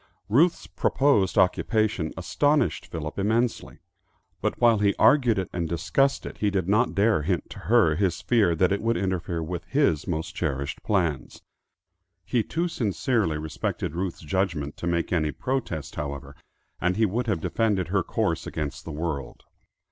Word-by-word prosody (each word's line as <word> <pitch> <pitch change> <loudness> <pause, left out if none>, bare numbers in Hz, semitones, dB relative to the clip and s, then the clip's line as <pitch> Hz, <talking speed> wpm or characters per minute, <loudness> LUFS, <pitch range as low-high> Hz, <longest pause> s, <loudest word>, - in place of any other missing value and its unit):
Ruth's 160 +11 +3
proposed 135 -10 +1
occupation 100 -1 +2
astonished 145 - +1
Philip 80 +1 -5
immensely, 115 +4 0 0.6
but - - -1
while 115 -3 +5
he 100 -1 +2
argued 120 -1 +4
it 95 - -1
and 85 -2 -2
discussed 135 - +1
it, - - -8
he 105 - +2
did 95 -3 -1
not 110 +5 +2
dare 105 -4 +3
hint 85 +3 -2
to - - -8
her 80 -2 +3
his 90 -1 0
fear 105 -8 +2
that 90 +3 +2
it 100 - 0
would 115 +1 +1
interfere 90 -3 -2
with 85 +1 -4
his 130 - +1
most 80 -1 -3
cherished 70 -2 -3
plans. 85 - -1 0.8
He 120 - +1
too 170 +10 -2
sincerely 110 - 0
respected 75 -1 -3
Ruth's 90 0 -3
judgment 80 -3 -2
to 85 - -4
make 85 +1 0
any 80 -3 +1
protest, 100 - -3
however, 70 -2 -5 0.4
and 90 +2 0
he 110 - +4
would 115 +5 -1
have 100 -6 0
defended 100 -1 0
her 95 0 +2
course - - -1
against 75 -3 -5
the 80 - -6
world. 75 -2 -4
95 Hz, 160 wpm, -26 LUFS, 80-110 Hz, 0.8 s, while